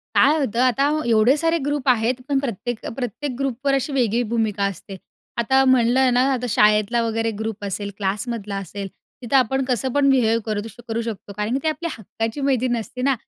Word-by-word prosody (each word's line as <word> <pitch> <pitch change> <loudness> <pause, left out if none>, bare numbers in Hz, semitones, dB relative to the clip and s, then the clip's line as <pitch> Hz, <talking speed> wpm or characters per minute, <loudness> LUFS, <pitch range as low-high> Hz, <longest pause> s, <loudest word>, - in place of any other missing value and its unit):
काय 295 +3 +5
होतं 245 -4 -1
आता, 255 +3 +3 0.2
एवढे 230 +4 +4
सारे 330 +2 +1
ग्रुप 290 -2 -1
आहेत, 240 0 +3
पण 280 -1 +2
प्रत्येक, 240 -2 -4
अ - - -3
प्रत्येक 255 +2 -4
ग्रुपवर 275 +1 0
अशी 275 +2 -1
वेगळी 240 -3 +1
भूमिका 210 -3 0
असते. 195 0 -5 0.4
आता 265 +3 +3
म्हणलं 255 0 +4
ना 250 - +4
आता 250 -1 -2
शाळेतला 210 +3 +3
वगैरे 225 0 -1
ग्रुप 220 -2 -4
असेल, 200 +1 -3
क्लासमधला 205 +1 -3
असेल, 195 +1 -5 0.3
तिथं 245 +3 +1
आपण 265 +1 +2
कसं 255 0 -1
पण 285 -1 +3
बिहेव 230 -3 +3
करू 210 -1 -1
दु 225 - -7 0.2
करू 225 +1 -1
शकतो 215 -3 -6
कारण 210 +3 -2
की - - +2
ते 315 - +1
आपल्या 335 +2 -2
हक्काची 225 +5 -4
मैत्रीण 255 -3 +1
असते 250 +3 -6
ना. 275 0 +3
240 Hz, 195 wpm, -22 LUFS, 215-265 Hz, 0.4 s, काय